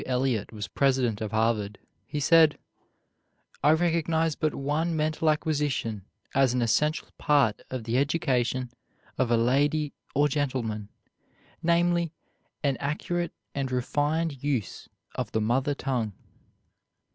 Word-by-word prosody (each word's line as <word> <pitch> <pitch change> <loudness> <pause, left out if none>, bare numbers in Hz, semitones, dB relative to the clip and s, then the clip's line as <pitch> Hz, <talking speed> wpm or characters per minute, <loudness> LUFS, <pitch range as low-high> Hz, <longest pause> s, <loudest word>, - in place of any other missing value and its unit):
Eliot 125 -4 0
was 105 -3 -5
president 125 -1 +1
of 110 - -2
Harvard, 110 -2 0 0.3
he 150 - -3
said, 160 +1 +5 1.1
"I - - +5
recognize 165 -1 +1
but 155 -1 -1
one 155 +4 -1
mental 155 +1 +1
acquisition 145 - -1 0.3
as 130 -2 +3
an 125 - +2
essential 150 +7 +1
part 140 -8 +3
of 130 -3 -4
the 115 +3 +1
education 130 -4 0 0.5
of 130 -3 +2
a 120 - +4
lady 145 +5 +2 0.2
or 145 +2 +4
gentleman, 125 -8 -2 0.7
namely, 170 0 +2 0.5
an 140 -2 +1
accurate 170 +4 -2 0.2
and 135 -2 -2
refined 145 +3 -1
use 130 - -2 0.2
of - - -4
the 110 - +1
mother 130 +6 +1
tongue." 120 -7 -2
140 Hz, 125 wpm, -27 LUFS, 120-155 Hz, 1.1 s, said